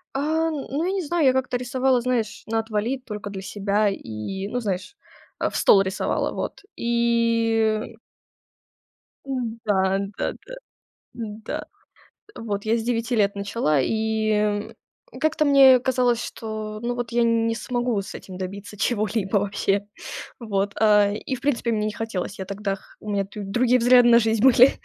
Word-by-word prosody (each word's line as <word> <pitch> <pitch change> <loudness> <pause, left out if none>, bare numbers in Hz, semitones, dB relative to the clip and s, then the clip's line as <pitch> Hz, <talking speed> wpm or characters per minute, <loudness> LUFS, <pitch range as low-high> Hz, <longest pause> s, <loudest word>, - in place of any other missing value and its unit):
Э-э, 315 +4 +1
ну, 295 +2 -3
я 370 - 0
не 390 -1 -1
знаю, 330 0 +1
я 260 - +5
как-то 255 -1 0
рисовала, 250 +1 +1
знаешь, 235 -3 -1
"на 225 0 0
отвали", 225 +3 -1
только 210 -5 -7
для 195 -1 -6
себя 205 +2 0
и, 190 - -5
ну, 245 +4 -2
знаешь, 200 - -4 0.4
а, - - +1
"в - - -10
стол" 195 - +6
рисовала. 190 0 -1
Вот. - - -5
И 230 -2 +1 1.3
Да-да-да, 215 - -2 0.6
да. 220 -2 -5 0.7
Вот 205 -3 -4
я 220 +1 +2
с 230 - -2
9 235 +1 -1
лет 200 -2 +2
начала 200 - 0
и, 220 - 0
м, 210 -1 0 0.5
как-то 310 0 +2
мне 270 -3 +7
казалось, 245 -2 +1
что 215 -2 -6
ну, 240 +1 -2
вот 240 -1 -4
я 235 0 +3
не 230 0 +2
смогу 240 -3 -1
с 205 - -9
этим 185 -1 -9
добиться 195 +2 -7
чего-либо 210 -2 0
вообще. 200 0 0 0.5
Вот. 200 -3 -1
А, 210 -2 +5
и, 215 +5 -4
в - - -13
принципе, 255 -4 0
мне 215 -1 0
не 215 - -2
хотелось. 205 -3 -4
Я - - -3
тогда 200 +1 -3
х 190 - -20 0.2
у 210 - -6
меня 200 -1 0
тут 200 0 -8
другие 250 +1 +3
взгляды 245 0 +6
на 235 0 +7
жизнь 220 -1 +1
были. 260 0 +7
225 Hz, 160 wpm, -24 LUFS, 205-245 Hz, 1.3 s, мне